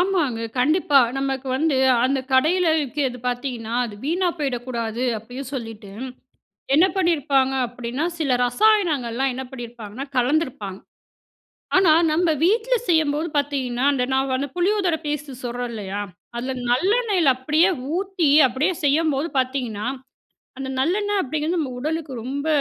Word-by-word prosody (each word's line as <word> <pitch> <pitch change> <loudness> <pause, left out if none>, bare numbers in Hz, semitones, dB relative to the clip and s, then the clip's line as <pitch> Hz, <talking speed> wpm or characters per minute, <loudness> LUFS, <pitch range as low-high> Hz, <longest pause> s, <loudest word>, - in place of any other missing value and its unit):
ஆமாங்க, 335 -11 +1 0.2
கண்டிப்பா. 295 +1 +4 0.2
நமக்கு 270 -1 -2
வந்து 305 -1 +1 0.3
அந்த 270 +1 +1
கடையில 330 +6 +3
விக்கிறது 270 -2 -2
பார்த்தீங்கன்னா, 245 -2 -4
அது 215 -3 -7
வீணா 350 +4 +1
போயிடக்கூடாது 245 -4 -3 0.2
அப்டியும் 245 +4 -8
சொல்லிட்டு, 225 -5 -7 0.9
என்ன 330 +5 +6
பண்ணியிருப்பாங்க 285 -7 +2
அப்டின்னா, 245 +5 -4
சில 275 -5 +2
ரசாயனங்கலாம் 270 - +2
என்ன 265 +1 -5
பண்ணியிருப்பாங்க 240 0 -7
கலந்திருப்பாங்க. 245 - 0 1.0
ஆனா, 370 -4 +6 0.2
நம்ப 335 +1 +2
வீட்ல 455 +6 +2
செய்யும்போது 315 -1 +2
பார்த்தீங்கன்னா, 270 -3 -1
அந்த 250 -2 0
நான் 265 0 +1
அந்த 280 +1 -2
புளியோதர 365 -2 +2
பேஸ்டு 290 -3 -4
சொல்றோன் 245 0 -3
இல்லையா 200 -1 -4 0.4
அதுல 255 +2 -3 0.2
நல்லெண்ணெயில 385 - +2
அப்டியே 305 +7 +3 0.3
ஊத்தி 380 -3 -1 0.2
அப்டியே 270 +9 0
செய்யும்போது 300 +1 +2
பார்த்தீங்கன்னா, 250 -5 -2 0.7
அந்த 265 0 -4
நல்லெண்ணெய் 405 +7 +1
அப்டிங்கிறது 310 +5 -2
நம்ம 280 -5 -2
உடலுக்கு 310 -1 -3
ரொம்ப 280 +4 -4
275 Hz, 120 wpm, -22 LUFS, 245-325 Hz, 1.0 s, என்ன